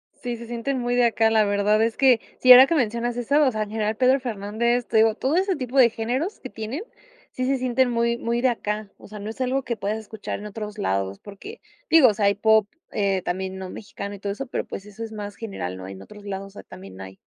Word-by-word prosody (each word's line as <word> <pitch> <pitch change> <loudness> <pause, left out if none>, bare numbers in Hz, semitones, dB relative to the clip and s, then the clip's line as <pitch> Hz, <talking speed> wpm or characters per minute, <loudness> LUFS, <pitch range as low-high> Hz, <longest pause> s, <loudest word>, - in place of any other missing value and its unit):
Sí, 245 -1 -5
se 235 - -10
sienten 240 +3 -2
muy 245 0 -1
de 245 -1 +4
acá. 225 -1 +3
La 220 -1 +3
verdad 205 +1 +2
es 225 0 +1
que, 260 -4 +5 0.2
si 255 - +6
ahora 255 +2 +11
que 335 - +1
mencionas 240 -2 -1
eso, 285 +5 +2
o 260 - +3
sea, 215 -1 -1
en 205 - -9
general, 215 0 -1
Pedro 260 +3 +3
Fernández, 235 +1 -1
te 225 - +1
digo, 220 0 +4
todo 280 +5 -1
ese 380 +1 +1
tipo 260 -1 -4
de 245 -3 +7
géneros, 250 - -3
que 260 - -8
tienen, 225 - -5 0.5
sí 255 - -3
se 270 0 +1
sienten 255 0 +1
muy, 235 0 +1
muy 235 0 -1
de 255 - +4
acá. 210 -3 -3
O - - -14
sea, 210 0 -9
no 210 +2 -6
es 240 +4 -7
algo 260 +1 0
que 235 -1 -3
puedas 210 +2 -2
escuchar 220 -1 -6
en 210 - -7
otros 210 0 -7
lados, 95 - -1
porque, 210 - -11 0.3
digo, 320 -6 +7
o - - 0
sea, 205 0 0
hay 200 0 +3
pop, 220 0 +3 0.2
eh, 195 -2 0
también 190 +1 -3
no 190 -1 -6
mexicano, 200 -1 -7
y - - -12
todo 200 0 -3
eso, 270 +6 -6
pero - - -3
pues, 195 - -8
eso 210 +2 -9
es 225 - -7
más 205 -2 -7
general, 180 - -5
¿no? 95 0 -8
En 95 0 -9
otros 210 - -13
lados, 195 0 -5
o - - -13
sea, 200 - -12
también 95 0 -12
hay. 95 0 -9
220 Hz, 260 wpm, -24 LUFS, 205-245 Hz, 0.5 s, ahora